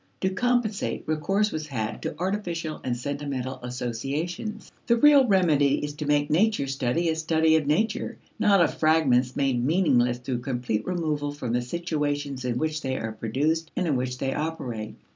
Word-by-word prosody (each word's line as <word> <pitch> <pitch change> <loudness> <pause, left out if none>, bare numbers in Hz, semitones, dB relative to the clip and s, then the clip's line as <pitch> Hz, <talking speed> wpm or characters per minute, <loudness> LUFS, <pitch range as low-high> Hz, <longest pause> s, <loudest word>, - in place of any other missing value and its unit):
To 190 - +1
compensate, 235 0 0
recourse 195 +7 +1
was 155 -1 -4
had 110 -6 -3
to - - -4
artificial 175 -4 -3
and 125 -2 -1
sentimental 140 -1 -4
associations. 135 - -4 0.2
The 235 - +4
real 285 0 +6
remedy 160 -9 +4
is 145 - -5
to 150 0 -5
make 145 0 +2
nature 205 -1 +3
study 135 +4 0
a 160 - +1
study 160 0 +3
of 155 -3 +1
nature, 210 +9 0 0.2
not 200 -3 +5
of 170 - +3
fragments 135 -6 +3
made 130 -3 +1
meaningless 125 -6 +3
through 125 0 -3
complete 120 -4 -2
removal 155 -5 -1
from 125 -5 -4
the 125 - +1
situations 145 -2 -2
in 120 -1 -1
which 155 +1 -1
they 130 -2 -2
are 110 - -3
produced 150 +9 -1
and 180 - 0
in 150 -5 +1
which 125 0 -2
they 135 +1 -1
operate. 130 -9 -4
150 Hz, 170 wpm, -26 LUFS, 125-170 Hz, 0.2 s, real